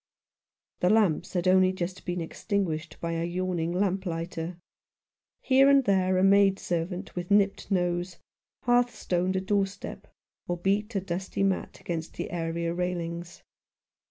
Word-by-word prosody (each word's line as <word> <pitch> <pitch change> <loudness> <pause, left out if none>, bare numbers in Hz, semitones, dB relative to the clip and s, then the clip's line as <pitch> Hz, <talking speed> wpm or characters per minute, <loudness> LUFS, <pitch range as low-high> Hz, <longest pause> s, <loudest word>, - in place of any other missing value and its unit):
The 180 - +3
lamps 205 -7 +2
had 180 -1 0
only 185 0 +5
just 185 0 -5
been 175 0 -1
extinguished 165 -3 -3
by 170 - -3
a 165 0 -1
yawning 175 -1 -1
lamplighter. 180 -3 -2 0.8
Here 270 +1 +5
and 275 -1 +6
there 190 -3 +2
a 185 - +3
maid 195 0 +5
servant 175 +1 -3
with 175 0 -4
nipped 200 -1 +2
nose 175 -2 0 0.5
hearthstoned 230 -7 +1
a 190 - +1
doorstep 200 0 -2 0.4
or 175 - -1
beat 205 +5 0
a 195 - +1
dusty 190 +1 -3
mat 195 -1 -1
against 165 -2 -5
the - - -5
area 170 0 -2
railings. 175 -1 -4
185 Hz, 135 wpm, -28 LUFS, 170-195 Hz, 0.8 s, and